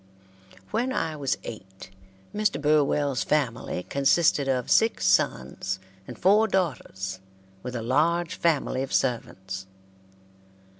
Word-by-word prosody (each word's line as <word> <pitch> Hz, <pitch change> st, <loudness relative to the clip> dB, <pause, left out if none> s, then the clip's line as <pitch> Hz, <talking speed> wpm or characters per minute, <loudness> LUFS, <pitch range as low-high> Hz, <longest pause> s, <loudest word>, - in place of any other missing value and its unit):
When 245 Hz, +3 st, 0 dB
I 160 Hz, -10 st, -1 dB
was 140 Hz, -3 st, -1 dB
eight, 95 Hz, -3 st, -10 dB, 0.4 s
Mr. 210 Hz, -8 st, 0 dB
Burwell's 145 Hz, -3 st, +2 dB
family 125 Hz, -10 st, -1 dB
consisted 140 Hz, -, +2 dB
of 130 Hz, -2 st, -1 dB
six 225 Hz, -, +3 dB
sons 95 Hz, -1 st, +1 dB, 0.3 s
and -, -, -8 dB
four 210 Hz, +4 st, +4 dB
daughters, 95 Hz, -, -2 dB, 0.4 s
with 125 Hz, +3 st, -6 dB
a 115 Hz, -, -3 dB
large 165 Hz, +8 st, +1 dB
family 150 Hz, -5 st, 0 dB
of 135 Hz, -, -4 dB
servants. 95 Hz, -6 st, -2 dB
140 Hz, 110 wpm, -26 LUFS, 105-165 Hz, 0.4 s, four